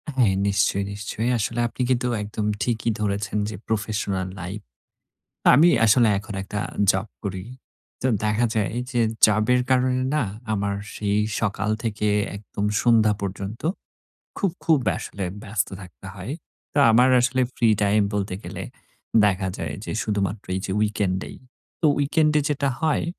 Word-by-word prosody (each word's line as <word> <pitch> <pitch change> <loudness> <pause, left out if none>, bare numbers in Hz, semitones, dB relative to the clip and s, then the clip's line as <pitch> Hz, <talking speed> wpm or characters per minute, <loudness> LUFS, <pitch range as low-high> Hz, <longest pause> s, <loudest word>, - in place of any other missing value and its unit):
হ্যাঁ 115 -7 +4
নিশ্চয়ই, 100 0 +1
নিশ্চয়ই। 105 +3 -3
আসলে 115 +2 -2
আপনি 125 - -6
কিন্তু 125 -1 +1
একদম 105 0 -3 0.2
ঠিকই 115 -1 0
ধরেছেন। 105 +1 -1
যে 110 - -6
প্রফেশনাল 105 -3 -1
লাইপ 95 +4 -6 0.9
আমি 160 +6 +7 0.2
আসলে 115 +1 +5
এখন 105 0 -8
একটা 105 +1 -4 0.3
জব 95 +3 0 0.2
করি। 95 -2 -4 0.6
তো 130 - +1 0.2
দেখা 105 +3 +2
যায় 110 0 0 0.2
যে 120 -2 0 0.3
জবের 110 +4 +3
কারণে 130 0 +2
না 150 - +2 0.3
আমার 100 -1 0 0.2
সেই 105 0 0 0.2
সকাল 105 0 -1
থেকে 105 -2 -1 0.3
একদম 100 0 -5 0.2
সন্ধ্যা 110 -3 +4
পর্যন্ত 100 +2 -5 0.8
খুব, 195 - +1
খুব 160 -3 +4 0.2
আসলে 100 -2 -5 0.2
ব্যস্ত 105 0 -1
থাকতে 90 +1 -12
হয়। 100 +7 -6 0.4
তা 145 - +4
আমার 125 +3 +6
আসলে 130 +1 +1 0.2
ফ্রি 115 -2 +3
টাইম 105 +1 +3
বলতে 100 -2 -1
গেলে - - -6 0.6
দেখা 95 -1 +1
যায় - - -4
যে - - -4
শুধুমাত্র 100 -2 -2
এই 95 - -1
যে 95 - -3
উইকেন্ড 100 -3 0
এই। - - -11 0.4
তো 160 - +3
উইকেন্ডে 150 +1 +3
যেটা 140 -1 0
হয় 155 -2 +1
105 Hz, 150 wpm, -24 LUFS, 100-120 Hz, 0.9 s, আমি